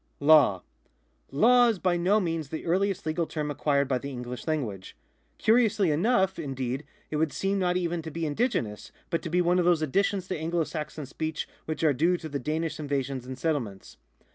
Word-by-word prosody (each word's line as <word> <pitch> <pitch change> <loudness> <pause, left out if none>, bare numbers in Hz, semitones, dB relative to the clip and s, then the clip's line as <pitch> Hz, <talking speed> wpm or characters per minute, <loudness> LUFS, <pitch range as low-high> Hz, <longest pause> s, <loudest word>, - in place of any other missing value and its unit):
LAW. 145 - +5 0.4
— - - -42 0.3
Law 245 - +5
is 225 -3 +1
by 180 -1 +1
no 185 +5 +3
means 165 -6 -2
the 160 - -5
earliest 190 +2 0
legal 160 +1 -1
term 150 -2 -3
acquired 140 -1 +1
by 130 -2 0
the 140 - -6
English 125 0 -7
language. 115 -12 -3 0.4
Curiously 220 -6 +3
enough, 190 +3 +2
indeed, 135 -2 -3 0.3
it 150 - -1
would 155 -1 +1
seem 195 0 -1
not 180 -1 +1
even 175 -1 -1
to 160 - -7
be 165 +1 -3
indigenous, 145 - -1 0.2
but 165 - 0
to 170 - -5
be 180 +2 +2
one 175 +1 +3
of 175 - +2
those 170 -3 +3
additions 190 +4 0
to 185 - -1
Anglo 165 +1 0
Saxon 150 -1 -5
speech 155 +3 -4 0.2
which 155 0 -4
are 155 -2 +4
due 170 +7 +2
to 165 - -7
the 140 -1 -3
Danish 155 +3 -2
invasions 135 -3 -3
and 130 0 -6
settlements. 125 -10 -3
160 Hz, 195 wpm, -27 LUFS, 140-180 Hz, 0.4 s, LAW